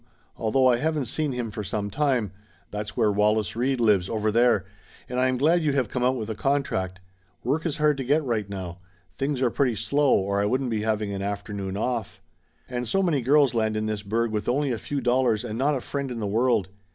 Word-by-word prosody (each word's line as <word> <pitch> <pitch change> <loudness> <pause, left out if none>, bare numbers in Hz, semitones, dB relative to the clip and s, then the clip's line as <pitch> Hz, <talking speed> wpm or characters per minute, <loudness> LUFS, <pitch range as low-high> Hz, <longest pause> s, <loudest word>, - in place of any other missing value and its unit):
"Al 110 - 0
though 130 +3 +3
I 125 -2 +5
haven't 150 +1 0
seen 150 +5 -2
him 120 -3 -3
for 105 0 -5
some 100 +1 -3
time 125 -5 +1 0.4
that's 105 0 -5
where 105 - +3
Wallace 105 +1 +1
Reid 130 +2 0
lives, 105 -6 +3
over 110 -1 0
there 115 -3 +3 0.4
and 125 0 -2
I 130 - +3
am 130 0 0
glad 165 +6 +3
you 150 -2 +1
have 130 -6 0
come 125 - -2
out 130 +1 +3
with 110 -4 -4
a 110 - -2
contract. 115 -8 -1 0.4
Work 150 +7 0
is 160 -1 -3
hard 150 -2 +3
to 135 - -2
get 145 +5 +2
right 110 -6 -1
now. 90 -3 -6 0.4
Things 135 -1 0
are 120 - +2
pretty 125 -3 +1
slow, 140 +5 +2
or 100 +1 0
I - - +1
wouldn't 130 +3 0
be 110 -2 0
having 105 -2 -1
an 95 - -4
afternoon 100 -1 -4
off. 115 -1 -2 0.5
And 125 -1 -3
so 195 - +1
many 160 -7 +1
girls 140 0 +4
land 110 -2 0
in 110 - -1
this 110 -1 -2
burg 115 +3 -1
with 105 +1 -2
only 140 +2 +1
a 115 - -2
few 140 +5 -3
dollars 125 -2 +2
and 110 -2 -4
not 140 +5 +1
a 130 - -3
friend 140 +1 -4
in 120 -2 -5
the 105 - -2
world. 110 -2 +1
120 Hz, 235 wpm, -25 LUFS, 105-135 Hz, 0.5 s, I